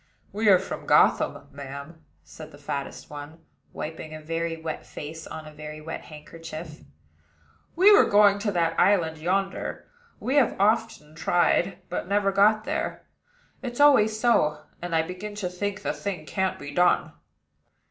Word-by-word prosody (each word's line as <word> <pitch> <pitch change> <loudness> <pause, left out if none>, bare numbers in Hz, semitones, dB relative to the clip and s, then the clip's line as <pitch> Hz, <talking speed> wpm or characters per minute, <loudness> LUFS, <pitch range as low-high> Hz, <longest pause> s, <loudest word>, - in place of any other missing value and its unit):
"We 210 +1 +2
are 190 - +8
from 190 - -6
Gotham, - - +3
ma'am," 140 +3 -9 0.2
said 155 -1 -12
the 145 - -14
fattest 140 0 -6
one, 150 +3 -10 0.3
wiping 155 0 -6
a - - -7
very 165 +1 -3
wet 160 -1 -5
face 160 +2 -8
on 155 -1 -8
a 155 - -10
very 150 0 -8
wet 160 +1 -7
handkerchief. 155 +1 -9 0.9
"We 390 +4 +7
were - - +5
going 205 -1 +5
to 205 0 -1
that 170 -3 0
island 170 -5 +3
yonder. 190 +4 -2 0.3
We 265 +3 0
have 265 -5 +3
often 210 -7 +1
tried, 175 +2 +1
but 180 - -4
never 200 0 +2
got 215 +2 +4
there: 310 +3 -3 0.6
it's 245 -1 -6
always 220 -7 +5
so, 150 -11 +2 0.2
and 175 -1 -3
I 160 - +3
begin 185 +5 -7
to 200 -4 -3
think 195 +2 -4
the - - -1
thing 185 -6 -5
can't 190 +6 -1
be 145 0 -8
done." 180 +3 +2
175 Hz, 160 wpm, -26 LUFS, 155-205 Hz, 0.9 s, are